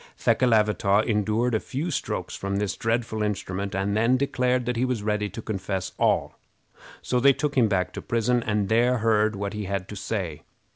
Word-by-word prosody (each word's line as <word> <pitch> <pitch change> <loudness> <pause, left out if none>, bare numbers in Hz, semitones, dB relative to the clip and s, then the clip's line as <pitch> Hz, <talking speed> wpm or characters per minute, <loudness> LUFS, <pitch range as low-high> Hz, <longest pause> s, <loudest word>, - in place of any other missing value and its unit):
Thekelavitaw 105 -4 +3
endured 110 +2 +1
a 110 - +2
few 150 +10 -4
strokes 140 - -3
from 100 0 -3
this 100 -2 -1
dreadful 115 -1 -1
instrument, 100 -1 -2
and 100 +1 0
then 115 +4 +3
declared 125 -2 0
that 125 0 -1
he 120 - 0
was 125 -5 -1
ready 105 -1 0
to 110 +4 -8
confess 95 -2 -3
all; - - +1 0.6
so 125 - +1
they 140 +2 +6
took 145 +1 -2
him 120 -4 +4
back 90 -3 0
to - - -6
prison 120 +1 +1
and 105 -3 0
there 120 +3 +3
heard 110 -1 +2
what 100 +1 -4
he 105 -1 -4
had 100 -1 -3
to 105 - -7
say. 95 -6 -4
110 Hz, 190 wpm, -25 LUFS, 100-120 Hz, 0.6 s, they